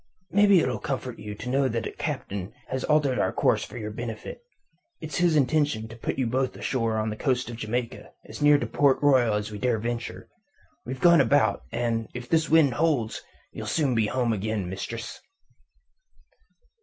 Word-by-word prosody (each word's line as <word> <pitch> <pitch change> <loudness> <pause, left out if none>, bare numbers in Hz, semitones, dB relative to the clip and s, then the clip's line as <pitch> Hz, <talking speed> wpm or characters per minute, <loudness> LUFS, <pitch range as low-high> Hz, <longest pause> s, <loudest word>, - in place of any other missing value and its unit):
"Maybe 200 -2 +6
it'll - - -1
comfort 130 -3 -4
you 105 0 -7
to 110 - -8
know 135 +1 +2
that 115 -2 -2
the - - -4
Captain 95 0 -4 0.2
has 130 0 -2
altered 145 -4 +2
our - - +1
course - - +2
for - - -9
your 105 -2 -5
benefit. 115 - -6 0.6
It's 155 -3 -5
his 175 -2 +3
intention 145 -5 +1
to 115 - -9
put 115 - -4
you 130 - +1
both 130 +2 -1
ashore 115 -4 -1
on 110 0 -1
the - - -4
coast 125 0 -1
of 115 - -7
Jamaica, 115 +2 -4
as - - -10
near 145 0 +6
Port 140 -1 +2
Royal 130 -6 +4
as 105 +1 -3
we 105 - -6
dare 120 0 +1
venture. 120 +2 -4 0.6
We've 130 +1 -5
gone 170 +1 +6
about, 110 -8 +2
and 115 -1 -1
if 120 0 -6
this 160 -2 +1
wind 155 -5 +5
holds 145 -7 0 0.3
ye'll - - -7
soon 145 -5 +1
be 110 -2 +2
home 120 0 0
again, 105 -2 -2
mistress." 105 +5 -6
125 Hz, 180 wpm, -26 LUFS, 110-140 Hz, 0.6 s, Maybe